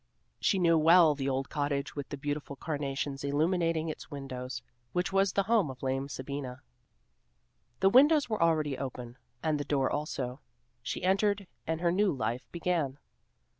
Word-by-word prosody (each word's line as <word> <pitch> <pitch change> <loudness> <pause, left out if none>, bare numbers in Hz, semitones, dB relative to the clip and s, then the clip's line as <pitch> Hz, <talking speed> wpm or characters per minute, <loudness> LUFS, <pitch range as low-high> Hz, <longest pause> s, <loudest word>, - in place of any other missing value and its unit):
She 195 - +2
knew 165 -3 +4
well 165 0 +7
the 135 -1 -2
old 135 +1 -1
cottage 145 -2 -1
with 145 -2 -5
the 145 - -5
beautiful 145 0 -4
carnations 140 -2 -3
illuminating 165 +3 +1
its 155 - -6
windows, 130 -4 -6 0.3
which 180 +2 -1
was 195 0 +3
the 200 - +2
home 215 -7 +2
of 130 0 -9
lame 135 +1 -1
Sabina. 130 -2 -6 1.2
The 190 - +6
windows 290 +6 +6
were 215 -5 -2
already 155 -5 +2
open, 125 -2 -6 0.2
and 155 -2 +1
the - - -1
door 140 -2 +1
also. 135 -3 -3 0.4
She - - -4
entered 200 +2 +2 0.2
and 160 +1 -1
her 170 -1 +3
new 195 +2 +3
life 120 -3 -3
began. 165 -6 -1
150 Hz, 160 wpm, -30 LUFS, 135-175 Hz, 1.2 s, well